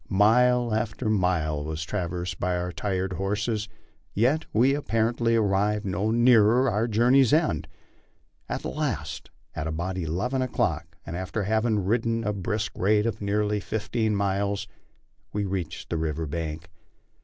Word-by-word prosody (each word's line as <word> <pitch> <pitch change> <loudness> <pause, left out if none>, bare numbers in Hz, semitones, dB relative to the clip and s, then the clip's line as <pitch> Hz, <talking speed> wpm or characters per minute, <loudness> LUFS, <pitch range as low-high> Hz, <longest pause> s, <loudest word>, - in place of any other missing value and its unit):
Mite 120 +4 +4
after 110 +1 -1
mile 85 -7 +1
was 80 +1 -4
traversed 90 +1 -3
by 90 0 0
our 90 0 -3
tired 95 0 -2
horses, 105 +4 -2 0.5
yet 130 +9 +2
we 125 +5 +4
apparently 115 -4 +1
arrived 105 -1 +1
no 95 +3 -1
nearer 120 +1 +5
our 110 +1 +1
journey's 120 +3 +4
end. 150 - +2 0.8
At - - -3
last, 65 - -3 0.3
at 80 0 -3
about 85 +4 -3
eleven 95 - -1
o'clock, 85 -10 -1
and 85 - -5
after 95 +4 -3
having 110 -1 +1
ridden 115 +2 +1
at 105 - -1
a - - -4
brisk 100 +2 -2
rate 105 +3 +2
for - - -11
nearly 105 +1 +1
fifteen 110 +3 -1
miles, 100 0 -1 0.7
we 105 0 -1
reached 90 -4 -4
the 85 - 0
river 80 0 -2
bank. 80 +1 -5
105 Hz, 145 wpm, -26 LUFS, 90-115 Hz, 0.8 s, nearer